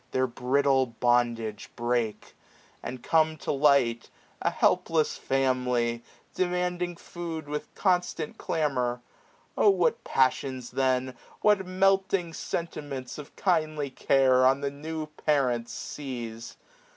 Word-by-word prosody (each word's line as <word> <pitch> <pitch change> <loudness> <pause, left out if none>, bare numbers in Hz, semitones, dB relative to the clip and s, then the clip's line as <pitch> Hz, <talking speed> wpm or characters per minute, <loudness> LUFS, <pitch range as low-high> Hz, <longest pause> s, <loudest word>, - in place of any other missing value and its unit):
Their 130 0 +1
brittle 130 +2 +2
bondage 120 -2 0
break; 120 -2 -2 0.5
and 125 -1 -7
come 160 +1 +2
to - - -3
light, 135 -5 +3 0.3
A - - +2
helpless 160 -2 +2
family, 125 -3 0 0.3
demanding 180 -1 -1
food 170 -2 -6
670 145 - -10
With 150 - -5
constant 180 -5 0
clamour: 125 -6 -1 0.5
O 210 - +5
what 185 -3 +2
passions 130 -1 0
then. 130 -1 +1 0.3
What 205 -3 +3
melting 190 -2 +2
sentiments 145 -7 -5
of 145 - -11
kindly 155 -6 0
care. 130 -1 +3
On 135 +2 +4
the 140 -1 -1
new 155 +2 -5
parents 135 -6 0
seize 120 -5 -6
140 Hz, 115 wpm, -27 LUFS, 125-160 Hz, 0.5 s, O